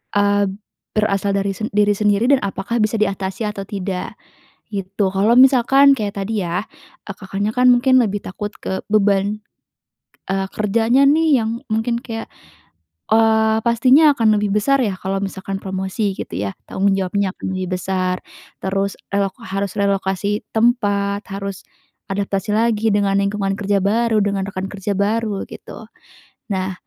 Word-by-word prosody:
eee, 205 0 +3 0.5
berasal 200 -2 +1
dari 200 0 -1
sen 220 - -3
diri 205 0 +3
sendiri, 210 +1 +2
dan 275 - +5
apakah 195 +4 -3
bisa 215 +1 0
diatasi 195 +1 -1
atau 210 -1 -6
tidak? 195 0 -4 0.5
Gitu. 195 0 -2
Kalau 205 +5 +3
misalkan 270 +1 +6
kayak 205 -2 -3
tadi 210 +1 -2
ya, 175 +5 -2 0.4
ah, 195 - -5
Kakaknya 200 +1 -3
kan 250 0 +5
mungkin 255 +1 +4
lebih 205 -3 -1
takut 205 +2 -5
ke 190 - -3
beban, 205 0 +2 0.9
eee, 195 0 -1
kerjanya 225 +5 +2
nih, 310 0 +4
yang 220 - -2 0.2
mungkin 230 +2 0
kayak 225 -3 -6 0.8
eee, 220 0 +4
pastinya 260 +6 +5
akan 220 -2 +4
lebih 205 0 -1
besar 275 +6 +2
ya, 205 -5 -1
kalau 195 +1 -2
misalkan 195 0 -4
promosi 190 +2 -2
gitu - - -7
ya? 100 0 -2 0.2
Tanggung 200 +1 +1
jawabnya 195 +1 0
akan - - -4
lebih 185 -1 -2
besar, 185 -1 -1 0.4
terus 195 +1 -1 0.2
relok 200 -1 0
harus 195 0 -3
relokasi 200 0 0
tempat, 205 -3 +1
harus 195 0 -5 0.5
adaptasi 195 0 -2
lagi 225 -1 +1
dengan 200 -1 +1
lingkungan 200 -1 -1
kerja 200 0 +1
baru, 225 +2 +2
dengan 200 -1 -1
rekan 190 -1 -4
kerja 200 0 -3
baru, 205 +1 -1
gitu. - - -11 0.7
Nah, 190 0 -2
200 Hz, 145 wpm, -19 LUFS, 195-220 Hz, 0.9 s, misalkan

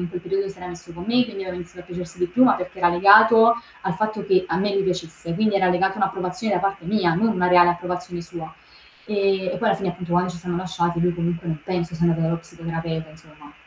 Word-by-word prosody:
in 175 - -3
quel 180 - -6
periodo 195 +2 -2
si 195 - -10
era 180 - -9
messo 175 -1 -10
con 175 +1 -9
me, 245 +3 +3
quindi 215 -5 -6
aveva 185 -1 -6
iniziato 180 0 -9
a - - -12
piacersi 180 0 -8
di 180 - +1
più, 215 +9 +1
ma 255 - +6
perché 180 +1 -7
era 175 - +4
legato 220 +6 +7 0.3
al 190 -1 -2
fatto 215 +1 -2
che 190 -2 +3
a - - 0
me 205 +1 0
mi 195 - +2
piacesse, 170 -2 -4
quindi 215 0 +1
era 185 -1 +3
legato 190 +2 +1
a - - -12
un'approvazione 190 +2 -1
da - - +1
parte 195 -3 -2
mia, 190 -4 +2
non 215 +6 +1
una 185 -5 +1
reale 175 -1 +6
approvazione 180 0 -4
sua. 165 -1 -9 0.5
Ehm, 195 -3 0
e - - -4
poi 225 - +1
alla - - +3
fine 195 -1 -3
appunto 175 -1 -7
quando 180 +1 +2
ci 175 - -8
siamo 175 0 -4
lasciati 175 -2 -2
lui 175 +1 +2
comunque 170 0 -3
non 160 -2 -3
penso 175 -2 -3
sia 170 +1 -1
andato 165 -1 +2
dallo 165 +1 0
psicoterapeuta 165 -1 -6
insomma. 150 -2 -17
180 Hz, 255 wpm, -22 LUFS, 170-195 Hz, 0.5 s, legato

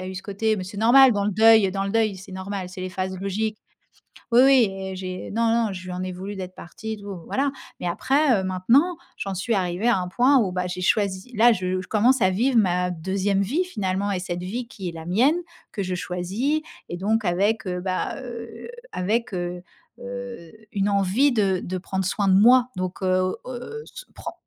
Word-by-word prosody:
a 185 - -6
eu 190 - -6
ce 185 - -6
côté 215 +2 -1
mais 185 - -4
c'est 190 +3 -9
normal 250 +4 +7
dans 200 -2 0
le 210 - +1
deuil 220 -1 +6
dans 195 +1 -2
le 195 - -2
deuil, 220 -3 +1
c'est 190 +1 -11
normal, 190 0 -5
c'est 185 +1 -9
les 185 - -3
phases 185 0 -4
logiques. 210 +2 -2 0.7
Oui, 235 - +7
oui 265 -4 +6
et 190 0 -6
j'ai 185 -1 -6
non 230 +2 +1 0.2
non, 205 - -3
je 185 -1 -7
lui 185 - -6
en 180 0 -4
ai 185 0 -4
voulu 190 +3 -6
d'être 185 -1 -7
partie 220 +6 -7
et - - -9
tout, 200 -3 -8
voilà. 275 +1 0 0.3
Mais - - -4
après, 265 - +2
heu, - - -4
maintenant 230 - +2 0.2
j'en 195 -1 -4
suis 210 +6 -1
arrivée 185 +2 -1
à 235 - +4
un 180 -1 -3
point 255 +8 +4
où, 210 -7 +1
bah, 180 0 -1
j'ai 180 0 -5
choisi 200 +3 0
là 235 +2 +6
je 185 -2 -1
je 185 - -9
commence 235 +5 +3
à 190 -2 +4
vivre 240 +7 +1
ma 180 -3 +2
2e 190 +3 -1
vie, 285 - 0
finalement 200 - -2
et 195 - 0
cette 175 -1 -4
vie 230 +7 -4
qui 200 -7 -7
est - - -5
la 165 -1 -9
mienne 245 - +3 0.4
que 200 - -3
je 185 -1 -2
choisis 190 - -2 0.3
et 175 - -4
donc 215 +5 0
avec, 200 +5 +1
heu, 180 -1 -2
bah, 185 0 -2
heu, 235 - -8 0.2
avec, 220 +5 -1
heu, 175 0 -4 0.4
heu, 245 -7 -7 0.2
une 200 0 0
envie 200 +8 +3
de 195 -5 +1
de 185 +1 -4
prendre 190 +1 -3
soin 200 +2 0
de 190 - +5
moi 245 +5 +6
donc 185 +1 -4
heu, 185 0 +1
heu, 255 - -6
s - - -11
pren - - -7
195 Hz, 225 wpm, -24 LUFS, 185-230 Hz, 0.7 s, normal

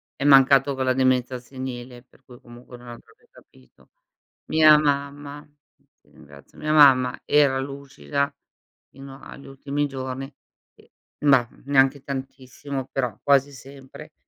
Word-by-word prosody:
è - - -6
mancato 135 0 +5
con 130 0 -3
la 130 - +1
demenza 130 -1 0
senile, 125 -1 -9
per 130 - -28
cui 125 -2 -16
comunque 120 -1 -15
non 120 0 -16
avrebbe 120 -1 -15
capito. 65 -1 -23 0.6
Mia 155 -1 +5
mamma 145 0 -3 0.5
ti - - -31
ringrazio, 70 0 -18
mia 155 0 -2
mamma, 130 -4 +5
era 145 -2 +2
lucida 140 +1 -5 0.6
fino 135 0 -13
agli 140 - -13
ultimi 140 +2 -4
giorni 135 0 -7 0.4
e - - -24 0.3
ma, 135 -4 +4 0.2
neanche 135 0 +2
tantissimo, 135 0 -7
però 125 -6 -3
quasi 140 0 +2
sempre, 135 0 -14
135 Hz, 130 wpm, -23 LUFS, 130-140 Hz, 0.6 s, mancato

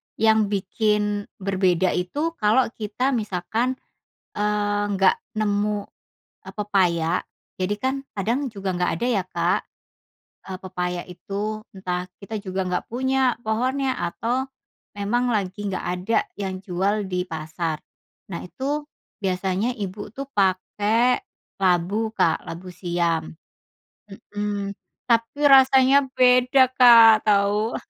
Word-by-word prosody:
yang 220 -1 +3
bikin 205 +1 0
berbeda 185 -2 +1
itu 290 - -1
kalau 225 +3 +3
kita 225 +5 -2
misalkan, 225 +2 -1 0.6
eee, 205 0 0
nggak 195 -1 +3 0.2
nemu, 205 -1 0 0.6
eee, - - -8
pepaya. 180 -5 +1 0.4
Jadi 185 +2 0
kan, 260 +6 -1 0.2
kadang 235 +8 -1
juga 200 -5 -4
nggak 180 0 +1
ada 235 +9 -2
ya 200 -6 +1
Kak, - - 0 0.9
eee, 190 -1 -6
pepaya 180 -1 -3
itu. 195 +3 -5 0.3
Entah 180 -1 -3 0.2
kita 215 +2 -5
juga 190 -2 -4
nggak 180 - -2
punya 260 +1 +1
pohonnya, 255 +4 0
atau 230 +9 -2 0.5
memang 240 +5 0
lagi 200 0 -2
nggak 190 -2 -3
ada 215 +5 +1 0.2
yang 190 -1 -4
jual 195 +3 -1
di 180 0 -1
pasar. 160 0 -4 0.5
Nah, 170 - -4
itu 285 +9 -3 0.3
biasanya 190 +3 -1
ibu 205 0 -6
tuh 275 0 -6
pakai 210 +4 +2 0.4
labu, 190 +5 +1
Kak, 165 -7 +1
labu 180 +2 -8
siam. 170 -3 -1 0.8
Mhm. 205 0 -4 0.3
Tapi 230 +3 +1
rasanya 270 0 +6
beda 250 +1 +5
Kak, 230 -4 +7
tau. 205 +2 +2
205 Hz, 115 wpm, -23 LUFS, 185-235 Hz, 0.9 s, Kak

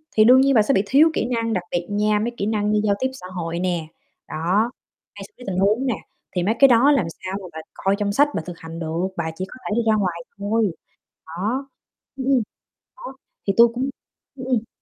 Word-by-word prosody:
thì 215 - +6
đương 255 +3 +7
nhiên 275 0 +4
bà 220 - +7
sẽ 270 +6 +2
bị 195 - +3
thiếu 290 +9 +5
kỹ - - 0
năng, 230 -1 0
đặc 180 -2 -1
biệt 175 0 -2
nha, 210 +1 +1
mấy 235 +3 -1
kỹ 200 - -1
năng 210 -1 0
như 210 0 +2
giao 205 -1 +2
tiếp 260 - +1
xã 185 -9 -10
hội 170 0 -3
nè, 175 -3 -1 0.4
đó, 190 +9 0 0.4
hay - - -8
xử 420 - -39
lý 250 - -12
tình 185 -2 -2
huống 210 +7 +2
nè, 245 -5 +1 0.4
thì 175 - +1
mấy 215 +4 +1
cái 275 - +9
đó 250 +3 +5
làm 275 - +3 0.2
sao 190 +1 -3
mà 185 - -8
bà 160 - -6
coi 195 +1 0
trong 205 -1 0
sách 290 +4 +5
bà - - 0
thực 175 -2 -8
hành 165 0 -8
được, 165 +3 -2
bà 160 -1 -2
chỉ 185 - -4
có - - -12
thể 210 - 0
đi 235 - +2
ra 215 - +4
ngoài 180 -5 -1 0.2
thôi, 205 -1 +1 0.6
đó. 215 +12 -3 0.5
Ừm, 265 -1 -4
ừm. 265 -4 +3 0.5
Đó, - - -9 0.3
thì 195 - +3
tôi 235 0 +8
cũng 265 +3 -1 0.5
ừm, 260 -1 -7
ừm. 235 -3 0
210 Hz, 245 wpm, -22 LUFS, 180-245 Hz, 0.6 s, cái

